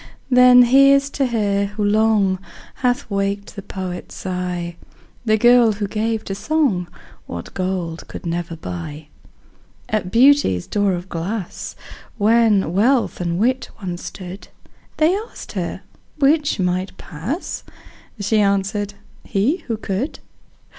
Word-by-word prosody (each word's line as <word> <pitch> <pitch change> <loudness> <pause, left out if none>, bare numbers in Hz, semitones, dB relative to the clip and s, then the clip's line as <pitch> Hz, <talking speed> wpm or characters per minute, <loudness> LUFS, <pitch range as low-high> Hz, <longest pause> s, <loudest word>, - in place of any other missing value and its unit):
Then 250 0 +8
here's 275 +2 +5
to 275 -2 0
her, 205 -4 +1
who 205 +1 -4
long 205 -2 +3 0.4
Hath 250 +1 0
waked 200 +1 -2
the 200 - -6
poet's 185 -2 -6
sigh, 180 -2 -3 0.5
The 215 -1 +3
girl 240 0 +6
who 205 0 -3
gave 220 +2 -1
to 195 - -4
song 215 - 0 0.4
What 85 0 -7
gold 185 -3 -3
could - - -9
never 170 0 -3
buy. 145 - -7 0.8
At 210 -4 -1
Beauty's 240 - +4
door 205 -2 +1
of 175 +1 -4
glass, 185 +3 -4 0.4
When 215 -5 +3
Wealth 235 +2 +2
and 170 -1 -1
Wit 255 +6 +1
once 180 -4 -5
stood, 185 +1 -8 0.5
They 320 +4 +4
asked 440 +4 -7
her - - -4 0.3
'which 295 -2 +2
might 185 +1 -1
pass?" 195 - -5 0.6
She 210 +2 +1
answered, 200 0 0 0.3
"he, 225 - +1
who 225 -3 -1
could." 215 +7 -3
205 Hz, 125 wpm, -20 LUFS, 180-240 Hz, 0.8 s, Then